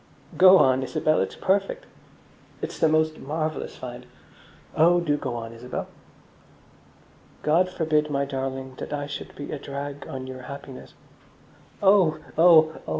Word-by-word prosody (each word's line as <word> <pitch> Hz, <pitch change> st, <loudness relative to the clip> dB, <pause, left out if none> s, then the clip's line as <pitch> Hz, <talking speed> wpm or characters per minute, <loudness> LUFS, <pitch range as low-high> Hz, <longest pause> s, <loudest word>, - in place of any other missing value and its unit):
"Go 185 Hz, +1 st, +8 dB
on, 130 Hz, -4 st, +4 dB
Isabel, 155 Hz, +3 st, 0 dB
it's -, -, -3 dB
perfect." 340 Hz, -, 0 dB, 0.7 s
"It's -, -, -6 dB
the 160 Hz, -, +4 dB
most 155 Hz, 0 st, +1 dB
marvellous 155 Hz, +2 st, -4 dB
find." -, -, -9 dB, 0.7 s
"Oh, 175 Hz, +3 st, +5 dB
do 155 Hz, -4 st, 0 dB
go 125 Hz, -4 st, -4 dB
on, 115 Hz, -1 st, -6 dB
Isabel!" 120 Hz, +2 st, -6 dB, 1.6 s
God 170 Hz, +5 st, +3 dB
forbid, 155 Hz, -4 st, 0 dB
my 140 Hz, -1 st, 0 dB
darling, 135 Hz, -1 st, -4 dB
that -, -, -6 dB
I 145 Hz, -1 st, -3 dB
should 145 Hz, 0 st, -8 dB
be 145 Hz, -, -7 dB
a 150 Hz, -, -4 dB
drag 140 Hz, +1 st, -6 dB
on 130 Hz, -1 st, -6 dB
your 130 Hz, 0 st, -8 dB
happiness. 140 Hz, -2 st, -10 dB, 0.9 s
"Oh! 190 Hz, -5 st, +5 dB, 0.2 s
oh! 160 Hz, -1 st, +5 dB
oh!" -, -, -5 dB
150 Hz, 145 wpm, -25 LUFS, 135-160 Hz, 1.6 s, Go